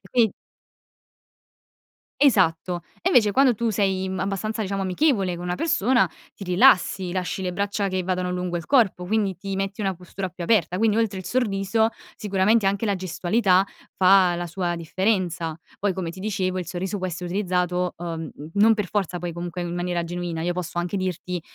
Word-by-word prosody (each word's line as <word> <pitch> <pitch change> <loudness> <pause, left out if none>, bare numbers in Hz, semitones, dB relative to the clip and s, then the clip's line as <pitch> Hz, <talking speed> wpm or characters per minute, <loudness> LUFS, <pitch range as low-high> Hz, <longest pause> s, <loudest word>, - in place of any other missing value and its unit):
quin 235 -4 +4 1.9
Esatto 180 - +3 0.2
e 370 - +1
invece 220 - +5
quando 260 +3 +4
tu 230 +1 -1
sei, 190 -2 0
mhmm, 190 0 -3
abbastanza 200 +3 -2
diciamo 195 0 -2
amichevole 190 - +1
con 175 - -7
una 180 0 -1
persona 240 - +2 0.2
ti - - -11
rilassi, 180 0 +4
lasci 185 +1 -2
le 180 -1 -2
braccia 200 +2 -1
che 185 -1 -1
vadano 180 0 -1
lungo 180 -1 -2
il 170 -1 -6
corpo 215 -9 +3
quindi 200 -2 0
ti 195 +1 -5
metti 195 +2 -3
una 195 -2 0
postura 185 +2 -6
più 180 0 -9
aperta. 180 -2 +2
Quindi, 220 0 +2
oltre 220 -4 0
il 185 - -11
sorriso, 220 -2 +1 0.3
sicuramente 205 +1 +2
anche 200 +3 +1
la 200 -2 +1
gestualità 185 +2 +2 0.3
fa 185 -1 +5
la 175 0 -4
sua 175 0 -2
differenza. 175 -1 -1 0.2
Poi 200 -1 +1
come 180 -3 -4
ti 185 - -11
dicevo 185 -2 -1
il 180 - -4
sorriso 185 +3 -3
può 185 - -2
essere 180 0 -5
utilizzato, 180 -2 0
ehm, 165 -2 -5 0.2
non 220 +2 +5
per 210 -4 -3
forza 190 -3 -1
poi 175 -1 -4
comunque 175 +1 -5
in 175 0 -4
maniera 175 0 -1
genuina. 170 -1 -4
Io 175 +1 0
posso 175 -1 -4
anche 175 +3 -2
dirti 180 -1 -3
185 Hz, 180 wpm, -24 LUFS, 175-205 Hz, 1.9 s, invece